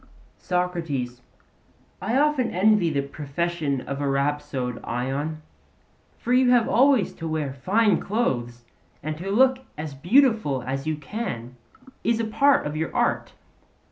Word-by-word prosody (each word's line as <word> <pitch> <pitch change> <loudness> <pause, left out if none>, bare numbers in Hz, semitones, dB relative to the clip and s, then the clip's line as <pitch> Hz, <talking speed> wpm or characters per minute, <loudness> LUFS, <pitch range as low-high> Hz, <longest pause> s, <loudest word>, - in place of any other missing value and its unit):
SOCRATES: 165 -9 -2 0.8
I 220 +7 0
often 290 -3 +2
envy 195 -1 +3
the 140 -3 0
profession 145 0 -2
of 140 +2 -5
a 140 - 0
rhapsode, 135 -3 -1
Ion; 140 +6 -3 0.7
for 245 - -1
you 255 0 +5
have 245 -2 +4
always 260 -5 +3
to 165 - -6
wear 155 -4 -2
fine 195 - +2
clothes, 120 - -2 0.4
and 155 +1 -3
to 190 +3 -5
look 260 +5 +4 0.2
as 150 -1 -5
beautiful 175 - +3
as 135 +3 -4
you 155 - 0
can 140 - -5 0.5
is 235 -1 +1
a 230 - 0
part 270 +6 +3
of 150 +1 -3
your 160 +1 -2
art. - - 0
160 Hz, 140 wpm, -24 LUFS, 140-220 Hz, 0.8 s, you